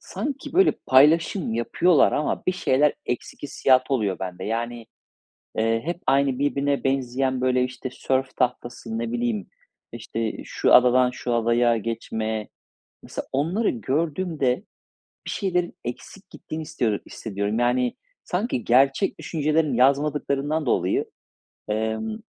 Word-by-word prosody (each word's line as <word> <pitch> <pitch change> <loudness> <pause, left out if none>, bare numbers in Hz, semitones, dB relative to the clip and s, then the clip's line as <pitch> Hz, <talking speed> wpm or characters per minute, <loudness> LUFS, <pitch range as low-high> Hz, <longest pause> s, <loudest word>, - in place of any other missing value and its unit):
sanki 280 -2 -5
böyle 380 +2 +5
paylaşım 150 - +4
yapıyorlar 165 +8 +3
ama 150 - -1
bir 185 - +3
şeyler 150 -5 +2
eksik 125 - -4
hissiyatı 135 -1 +2
oluyor 100 -6 0
bende. 95 0 -5
Yani, 115 +1 -3 0.7
eee, 115 +1 +2
hep 175 +2 -3
aynı 135 -1 +2
birbirine 140 0 0
benzeyen 130 -1 0
böyle 125 0 +2
işte 125 0 -6
sörf 130 0 -1
tahtası, 125 - -2
ne 230 0 -3
bileyim, 240 -3 -1 0.5
işte 115 -1 -4
şu - - +2
adadan 125 0 +6
şu 125 -1 -3
adaya 120 +1 +3
geçme. 110 -1 -3 0.5
Mesela - - -6
onları 170 +11 +1
gördüğümde 150 - -1 0.6
bir - - -3
şeylerin 180 -3 -1
eksik 185 +10 -8
gittiğini 160 +1 -7
istiyor 120 -9 -1
hissediyorum. 100 0 -3
Yani, 125 +1 +1 0.3
sanki 180 - -2
gerçek 135 +8 +3
düşüncelerini 155 -3 0
yazmadıklarından 140 +2 +1
dolayı, 90 -5 +1 0.6
emm, 110 - -2
130 Hz, 120 wpm, -24 LUFS, 120-155 Hz, 0.7 s, adadan